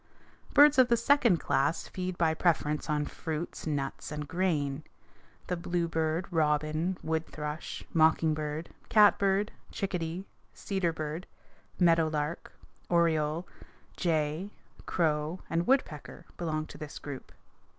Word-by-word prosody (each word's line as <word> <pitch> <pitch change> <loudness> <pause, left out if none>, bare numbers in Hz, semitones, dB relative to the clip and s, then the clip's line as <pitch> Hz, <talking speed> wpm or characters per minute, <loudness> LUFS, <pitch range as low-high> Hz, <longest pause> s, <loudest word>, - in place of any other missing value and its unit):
Birds 290 -1 +8
of 255 - +7
the 235 -1 +3
second 235 -6 +4
class 150 +4 0
feed 185 -1 -4
by 160 -2 +3
preference 155 -2 +1
on 150 -1 +1
fruits, 160 +1 -5
nuts, 145 -1 -3
and 150 -1 -4
grain. 155 -6 0 0.6
The 180 - -1
bluebird, 170 -1 -1
robin, 155 +2 +1
wood 160 0 -1
thrush, 150 +1 -5
mocking 160 0 +4
bird, 155 +1 -4 0.2
catbird, 205 -1 +4 0.2
chickadee, 180 -1 -3 0.3
cedar 190 -4 -1
bird, 155 +2 -5 0.5
meadow 165 -2 +5
lark, 155 +1 -3 0.4
oriole, 165 -1 +2 0.5
jay, 160 +2 0 0.4
crow, 155 0 0
and 170 +1 0
woodpecker 170 - 0
belong 155 -2 -2
to - - -12
this 150 -1 -7
group. 140 -3 -8
160 Hz, 120 wpm, -30 LUFS, 150-180 Hz, 0.6 s, Birds